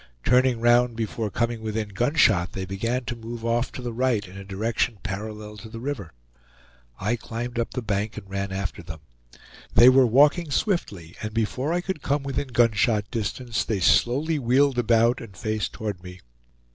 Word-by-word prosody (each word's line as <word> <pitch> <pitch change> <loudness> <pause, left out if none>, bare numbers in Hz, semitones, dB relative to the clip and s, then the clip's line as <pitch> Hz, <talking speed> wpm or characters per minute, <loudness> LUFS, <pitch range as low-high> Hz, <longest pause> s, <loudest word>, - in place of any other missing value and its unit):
Turning 125 -1 +3
round 120 0 +4
before 110 -1 -3
coming 115 +2 -1
within 110 -1 -3
gunshot, 110 - +2
they 95 -1 -4
began 115 +7 -2
to 120 - -3
move 115 0 -7
off 120 +1 0
to 125 - -8
the 120 -1 -4
right 115 -4 0
in 95 - -13
a 100 - -8
direction 110 +4 -1
parallel 105 +1 -6
to 110 +1 -10
the 115 - -8
river. 115 - -5 0.9
I 105 +5 0
climbed 120 +1 -5
up 115 - -3
the 125 - -2
bank 105 +1 -2
and 100 -2 -8
ran 100 0 -3
after 95 -2 -4
them. 80 -2 -9 0.7
They 120 - +9
were 130 -1 +6
walking 150 +7 +4
swiftly, 105 - -2
and 110 0 -5
before 125 +6 -1
I 175 +1 +1
could 190 -4 -4
come 140 0 0
within 140 0 -2
gunshot 115 -3 +2
distance 115 +1 -2
they 110 -3 -2
slowly 140 - +3
wheeled 130 +1 +3
about 115 +1 +3
and 100 -5 -11
faced 110 -1 -2
toward 105 -6 -5
me. 90 0 -11
115 Hz, 180 wpm, -25 LUFS, 105-125 Hz, 0.9 s, They